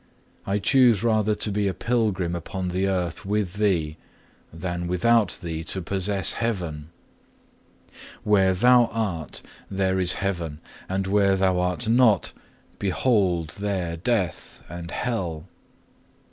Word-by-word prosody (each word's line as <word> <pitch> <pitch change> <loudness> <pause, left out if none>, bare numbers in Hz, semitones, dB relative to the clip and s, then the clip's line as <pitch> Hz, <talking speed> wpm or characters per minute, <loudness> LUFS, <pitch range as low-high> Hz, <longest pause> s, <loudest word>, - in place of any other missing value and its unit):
I 100 +1 +1
choose 120 0 +4
rather 110 -2 +2
to 105 - -1
be 100 0 0
a 95 - -2
pilgrim 105 -8 0
upon 90 +2 -4
the 95 +2 0
earth 90 -3 -2
with 100 -1 -2
Thee 85 -7 0 0.5
than 85 +1 -4
without 105 +4 +2
Thee 80 -1 -4
to 95 - -2
possess 95 +1 -1
heaven. 85 -10 -3 1.3
Where 95 -3 +3
Thou 125 +4 +5
art, 100 -10 -3 0.3
there 95 -1 0
is 90 -1 +4
heaven; 85 -6 -3 0.3
and 95 +1 -1
where 100 0 +3
Thou 95 -1 +2
are 90 0 0
not, 115 -5 +4 0.5
behold 95 -5 +1
there 95 -5 -2
death 95 -1 -2
and 85 0 -8
hell. 90 -11 -3
95 Hz, 125 wpm, -24 LUFS, 85-105 Hz, 1.3 s, Thou